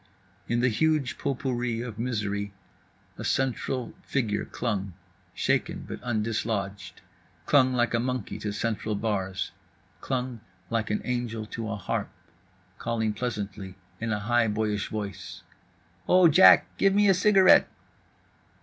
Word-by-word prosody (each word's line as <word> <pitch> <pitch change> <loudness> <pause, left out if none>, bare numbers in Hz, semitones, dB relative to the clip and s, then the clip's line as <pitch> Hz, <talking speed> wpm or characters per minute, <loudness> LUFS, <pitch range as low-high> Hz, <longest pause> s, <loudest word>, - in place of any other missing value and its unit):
In 120 0 +1
the 125 - +3
huge 150 +2 +1
potpourri 125 -4 -2
of 115 -3 -7
misery 100 -4 -2 0.7
a - - -4
central 130 -2 -1
figure 115 -7 -1
clung, 100 -5 -3 0.4
shaken - - 0
but - - -6
undislodged. 105 -4 -3 0.4
Clung 130 -3 +4
like 120 -1 +1
a 115 - +2
monkey 125 -4 -3
to 105 0 -3
central 110 0 -2
bars. 95 -3 -2 0.5
Clung 125 -2 -3 0.3
like 115 -1 0
an 105 - 0
angel 120 -3 -2
to 110 +1 -5
a 100 - -2
harp. 100 - -3 0.7
Calling 110 -2 -1
pleasantly 105 -4 -4 0.2
in 115 0 -2
a 105 - +1
high 120 +2 +2
boyish 105 -1 -1
voice: 100 -3 -6 0.6
"O 180 -1 +6
Jack, 95 - +7
give 195 0 +3
me 205 0 +5
a 195 - +6
cigarette." 190 0 +6
115 Hz, 130 wpm, -27 LUFS, 105-125 Hz, 0.7 s, Jack